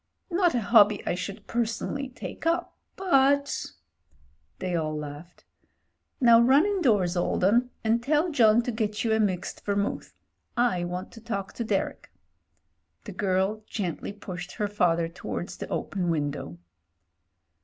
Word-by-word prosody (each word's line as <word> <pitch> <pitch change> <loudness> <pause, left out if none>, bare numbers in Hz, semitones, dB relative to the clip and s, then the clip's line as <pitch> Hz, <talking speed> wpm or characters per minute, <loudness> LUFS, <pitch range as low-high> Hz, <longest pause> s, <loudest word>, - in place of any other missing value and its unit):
Not 350 -4 +2
a 240 - +1
hobby 210 -2 +5
I - - 0
should 200 +3 -5
personally 235 +4 -2
take 270 +5 -6
up, 335 +1 0 0.2
but 280 -6 +2 0.5
'' 70 +2 -37
They 180 -1 -2
all 155 -2 -1
laughed. 150 +4 -9 0.7
"Now 235 -3 +7
run 270 +7 +5
indoors, 230 - +2
old 175 0 0
'un, 235 +6 +4
and 230 +1 +2
tell 300 +6 +1
John 235 -4 +5
to 245 - -2
get 215 -2 -2
you 225 -2 +2
a 220 - +2
mixed 190 -4 -1
Vermouth 200 0 -2 0.3
— - - -44 0.2
I 175 -1 -2
want 180 +2 -5
to 225 - -12
talk 200 -4 -4
to 235 - -3
Derek." 205 -3 -2 0.9
The 210 - -8
girl 190 +2 0
gently 185 -3 -3
pushed 180 -3 -8
her 210 - -1
father 170 -5 +1
towards 175 +1 -6
the - - -6
open 180 -3 -2
window. 145 - -2
205 Hz, 150 wpm, -27 LUFS, 180-240 Hz, 0.9 s, Now